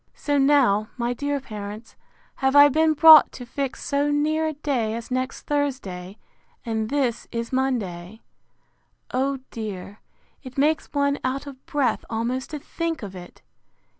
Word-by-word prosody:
So 290 -1 0
now, 265 -7 +3
my 240 0 -1
dear 285 +3 -2
parents, 215 -2 -8 0.4
have 265 +1 +1
I 290 0 +9
been 315 +2 +3
brought 315 -1 +9
to 245 - -8
fix 270 +2 -4
so 285 +1 0
near 310 +2 +1
a 310 - -2
day 265 -7 -1
as 230 +2 -7
next 255 +1 -2
Thursday; 225 -11 -3 0.5
and 220 -1 -2
this 260 -4 -1
is 230 +1 -4
Monday. 220 -7 -2 0.9
O 270 +2 0
dear, 205 -2 -7 0.4
it 255 -2 -11
makes 300 +2 +1
one 280 -1 +1
out 260 +2 -2
of 270 -2 -11
breath 265 -6 0
almost 240 +3 -2
to 305 - -5
think 325 0 -4
of 195 -2 -7
it! 180 -1 -12
260 Hz, 150 wpm, -24 LUFS, 225-285 Hz, 0.9 s, I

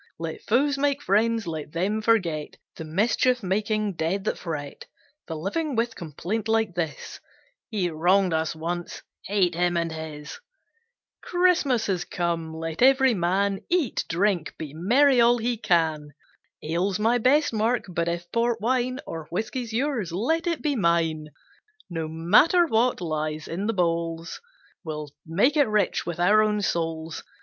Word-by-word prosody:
Let 165 -1 -5
foes 280 +4 +1
make 285 0 +1
friends: 225 +2 +2
let 155 -2 -6
them 200 +6 0
forget 180 -10 0 0.2
The - - -7
mischief 225 +8 +1
making 205 0 -1
dead 170 +5 -1
that - - -1
fret 150 -5 -6 0.4
The 160 - -4
living 250 - -2
with 230 +1 0
complaint 180 +7 -4
like 225 -3 +1
this 165 -4 -4 0.5
"He 205 -6 0
wronged 180 +3 +2
us 160 0 -1
once, 170 +2 -5 0.2
hate 190 -3 +2
him 175 +1 +1
and 165 -1 -1
his." 155 -2 -7 0.8
Christmas 350 -10 +2
has 185 -3 -1
come; 170 -2 -2
let 160 +2 -5
every 265 0 +5
man 195 +1 0
Eat, 345 -8 +1
drink, 175 -1 0
be 150 -3 -7
merry 245 - +4
all 240 +1 +5
he 240 +1 -1
can. 160 -8 0 0.5
Ale's 175 +5 0
my 230 +3 +2
best 285 +4 +3
mark, 225 +2 +1
but 170 -2 -2
if 170 0 -2
port 235 0 +1
wine 255 +3 0
Or 160 -2 -7
whisky's 230 +5 -3
yours 235 - -1
let 320 - 0
it 335 -1 -1
be 295 -2 +1
mine; 165 -6 +1 0.6
No 165 -2 -3
matter 190 - +4
what 240 - +1
lies 155 -2 -3
in 190 +5 -3
the 225 - 0
bowls, 165 -2 -2 0.4
We'll 150 -3 -6 0.2
make 205 - +2
it 290 -3 +4
rich 210 -5 0
with 170 -1 -4
our 205 +5 +5
own 210 -1 +1
souls. 165 -2 -2
190 Hz, 155 wpm, -25 LUFS, 165-230 Hz, 0.8 s, every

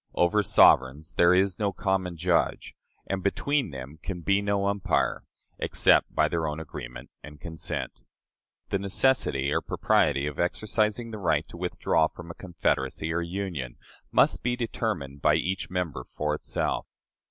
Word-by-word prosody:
Over 90 +5 +3
sovereigns 75 -4 +4
there 85 0 +5
is 95 0 +2
no 105 -2 +1
common 95 -3 -1
judge, 85 +1 0 0.3
and 95 -1 -3
between 140 +8 0
them 70 +2 -9
can 90 0 -5
be 100 +3 +2
no 100 -1 0
umpire, 100 -2 0 0.3
except - - +3
by - - +4
their 80 -2 -1
own 75 +1 -3
agreement 60 -6 -8
and 75 -1 -12
consent. 80 0 -5 0.7
The 100 - 0
necessity 95 - +1
or - - +1
propriety 70 - +1
of 75 0 -5
exercising 110 +5 0
the 110 - -6
right 80 -5 +1
to - - -11
withdraw 85 -2 +1
from 85 +1 -10
a - - -8
confederacy 80 -4 -2
or 85 - 0
union 85 -8 -4 0.3
must - - +3
be 120 0 0
determined 105 - -3
by 75 +1 +4
each 90 +4 -2
member 85 -9 -3
for 75 +4 -3
itself. 75 - -2
85 Hz, 155 wpm, -27 LUFS, 75-100 Hz, 0.7 s, there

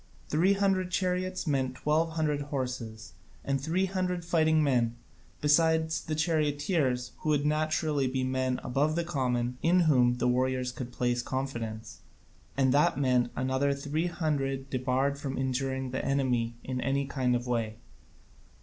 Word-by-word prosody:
Three 175 +6 +3
hundred 195 -2 +1
chariots 185 0 -1
meant 135 -4 0
twelve 160 +4 +1
hundred 150 -3 0
horses 125 -5 -4 0.3
and 135 -1 0
three 170 +6 +1
hundred 180 -2 -2
fighting 160 -2 +3
men, 120 -5 +1 0.5
besides 160 +1 +3
the 155 - -3
charioteers, 150 -4 0
who 155 - -3
would 145 -1 +2
naturally 155 -2 +1
be 130 0 -1
men 130 0 0
above 145 +5 +1
the 170 - 0
common, 125 -6 -1
in 180 +2 +4
whom 125 -7 +4
the 125 - 0
warriors 130 0 +1
could 125 -1 -7
place 120 0 0
confidence: 120 -4 -4 0.6
and 130 -2 +3
that 145 -2 +3
meant 125 -3 +2
another 130 +2 +1
three 150 +4 -2
hundred 140 -5 -2
debarred 130 +2 0
from 135 -2 -4
injuring 130 0 -2
the 130 - -2
enemy 125 -4 0
in 130 -1 -3
any 140 +2 0
kind 130 -3 0
of 120 0 -2
way. 115 -3 -1
135 Hz, 150 wpm, -29 LUFS, 125-155 Hz, 0.6 s, in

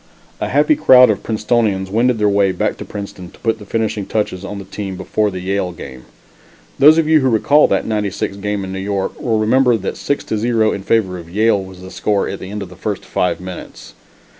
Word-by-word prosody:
A - - -2
happy 310 - +3
crowd 125 - +7
of 105 - -3
Princetonians 105 -3 0
wended 120 +3 +2
their 105 -1 +2
way 100 -1 +3
back 90 - -1
to - - -7
Princeton 100 -3 -8
to - - -19
put 115 -1 0
the 105 - -12
finishing 110 -3 -2
touches 100 -4 -2
on 100 +1 -6
the 100 - -8
team 100 -3 -6
before 105 +2 0
the 95 -2 -6
Yale 95 -1 -1
game. 65 -6 -10 0.7
Those 155 +3 +7
of 165 -2 +2
you 160 0 +5
who 130 -2 +2
recall 140 +6 +4
that - - 0
'96 105 -2 -2
game 105 0 -3
in 95 0 -6
New 95 - -4
York 100 0 -3
will 115 -3 0
remember 120 +2 +3
that 100 - -5
6 140 - -2
to 110 - -3
0 115 -1 +2
in 100 - -4
favor 95 -3 0
of 85 -1 -12
Yale 105 +1 +2
was 95 -1 -12
the 95 - -10
score, 105 -2 0
at - - -5
the 95 - -8
end 105 0 -5
of 95 - -10
the 90 - -13
first 100 +2 -4
five 90 - -1
minutes. 90 -1 -9
105 Hz, 230 wpm, -17 LUFS, 95-115 Hz, 0.7 s, crowd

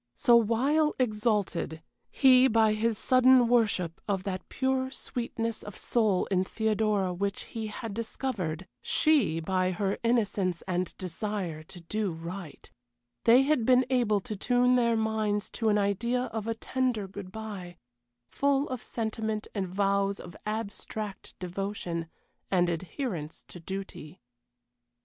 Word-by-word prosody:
So 240 - +5
while 265 +8 +3
exalted 210 -8 0 0.3
he 260 -1 +6
by 220 -2 +4
his 220 0 0
sudden 255 0 +5
worship 210 -8 +1
of 195 -2 -1
that 190 -2 -5
pure 260 0 0
sweetness 230 -3 -4
of 205 - -9
soul 215 -6 +1
in 185 -1 +3
Theodora 215 -2 0
which 200 +2 -2
he 225 -2 -5
had 215 0 -6
discovered, 200 -7 -3 0.2
she 270 - +3
by 185 +2 0
her 195 +2 -1
innocence 205 -7 +1
and 180 -1 -2
desire 185 -2 -4
to 175 +1 -11
do 210 +3 -2
right 170 +1 -8 0.6
they 245 +3 +7
had 280 -4 +2
been 255 +2 +5
able 225 -5 +2
to 215 +2 -5
tune 245 +4 +3
their 235 -2 +3
minds 215 -2 0
to 225 -2 0
an 210 - +3
idea 210 +5 +1
of 220 -1 -3
a 225 - -1
tender 245 -3 -1
good 190 -1 -9
bye, 195 -5 -7 0.5
full 280 +1 +1
of 255 -2 -4
sentiment 220 -2 -3
and 195 -3 -2
vows 200 +1 +1
of 175 - -10
abstract 215 -1 -5
devotion, 180 -2 -4 0.4
and 175 -2 +3
adherence 170 - -4
to 175 - -10
duty. 190 -2 -7
210 Hz, 135 wpm, -29 LUFS, 185-235 Hz, 0.6 s, they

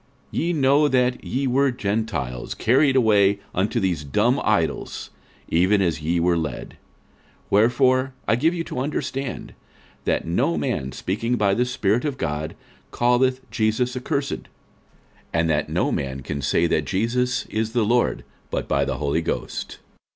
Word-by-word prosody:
46:012:002 - - -4
Ye 170 +2 0
know 145 0 +4
that 125 -2 +1
ye 135 +2 -2
were 135 +2 +3
Gentiles, 105 - -3
carried 135 +4 +3
away 105 -5 +4 0.2
unto 105 +6 0
these 90 -7 -1
dumb 70 -2 +1
idols, - - -1 0.4
even 95 +5 +3
as 85 -5 0
ye 85 +3 0
were 85 0 +2
led. 80 -2 -4
46:012:003 - - -18 0.8
Wherefore 130 +5 +3
I - - +4
give 160 +8 +2
you 165 - -2
to 125 - -5
understand, 135 -1 -3 0.5
that - - 0
no 85 0 +1
man 65 -2 -2
speaking 105 - -2
by 100 -4 +2
the 125 +4 +2
Spirit 115 -2 0
of 145 -3 -2
God 75 - -3 0.4
calleth 125 +2 +2
Jesus 120 +3 0
accursed: 140 +2 -2 0.8
and 80 0 +1
that 75 -1 0
no - - 0
man 65 -1 -3
can 70 +2 -4
say - - +2
that - - +1
Jesus 125 +5 0
is 110 +1 -2
the 120 -3 +2
Lord, 120 +3 +1 0.3
but - - -3
by - - +2
the - - -2
Holy 75 +2 0
Ghost. 80 - -4
115 Hz, 160 wpm, -23 LUFS, 85-130 Hz, 0.8 s, know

